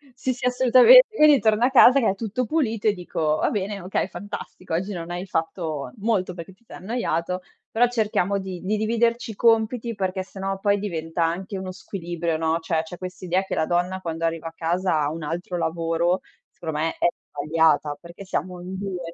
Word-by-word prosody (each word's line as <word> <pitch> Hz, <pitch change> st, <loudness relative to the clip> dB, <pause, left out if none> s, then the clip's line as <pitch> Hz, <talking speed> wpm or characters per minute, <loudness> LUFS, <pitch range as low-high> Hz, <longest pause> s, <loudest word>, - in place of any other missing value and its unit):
Sì, 255 Hz, 0 st, -1 dB
sì, 250 Hz, -, -6 dB
assolutamen 255 Hz, -, +8 dB, 0.2 s
quindi 300 Hz, -3 st, +7 dB
torno 220 Hz, +1 st, +2 dB
a 260 Hz, -, +1 dB
casa 265 Hz, +1 st, +7 dB
che 230 Hz, -, +2 dB
è 195 Hz, -, 0 dB
tutto 225 Hz, +4 st, -2 dB
pulito 225 Hz, -6 st, 0 dB
e 210 Hz, -, +4 dB
dico: 160 Hz, -4 st, -1 dB
"Va -, -, +1 dB
bene, 200 Hz, -1 st, -2 dB
okay, 185 Hz, +1 st, -1 dB
fantastico. 185 Hz, -2 st, -8 dB
Oggi 190 Hz, +5 st, -1 dB
non 170 Hz, -1 st, -6 dB
hai 180 Hz, +2 st, -4 dB
fatto 160 Hz, -4 st, -3 dB
molto 200 Hz, -4 st, 0 dB
perché 175 Hz, +2 st, -9 dB
ti 215 Hz, -, -31 dB
sei -, -, -10 dB
annoiato, 185 Hz, -4 st, -2 dB, 0.3 s
però 240 Hz, +2 st, +4 dB
cerchiamo 210 Hz, -4 st, 0 dB
di 190 Hz, -2 st, -5 dB
di 205 Hz, +3 st, -1 dB
dividerci 230 Hz, +1 st, 0 dB
i -, -, -10 dB
compiti 230 Hz, +1 st, +2 dB
perché 190 Hz, -1 st, -2 dB
sennò 195 Hz, 0 st, -5 dB
poi 205 Hz, 0 st, +2 dB
diventa 165 Hz, -4 st, -2 dB
anche 185 Hz, +4 st, -2 dB
uno 190 Hz, 0 st, -5 dB
squilibrio, 170 Hz, -3 st, -4 dB
no?", 160 Hz, 0 st, +1 dB
cioè 160 Hz, -1 st, -1 dB
c'è 175 Hz, +2 st, -9 dB
quest'idea 185 Hz, 0 st, -2 dB
che -, -, -4 dB
la 160 Hz, -, +1 dB
donna 180 Hz, +2 st, -1 dB
quando 165 Hz, -1 st, -3 dB
arriva 165 Hz, 0 st, -2 dB
a -, -, -20 dB
casa 170 Hz, 0 st, 0 dB
ha 145 Hz, -, +1 dB
un 160 Hz, 0 st, -6 dB
altro 175 Hz, +3 st, -4 dB
lavoro, 165 Hz, +2 st, 0 dB, 0.3 s
secondo 160 Hz, -3 st, -6 dB
me, 165 Hz, -, +1 dB
è -, -, +4 dB, 0.2 s
sbagliata, 150 Hz, -1 st, +1 dB
perché 170 Hz, +3 st, -11 dB
siamo 180 Hz, -1 st, -3 dB
in 185 Hz, +1 st, -6 dB
2. 180 Hz, -4 st, -5 dB
185 Hz, 200 wpm, -24 LUFS, 165-215 Hz, 0.3 s, assolutamen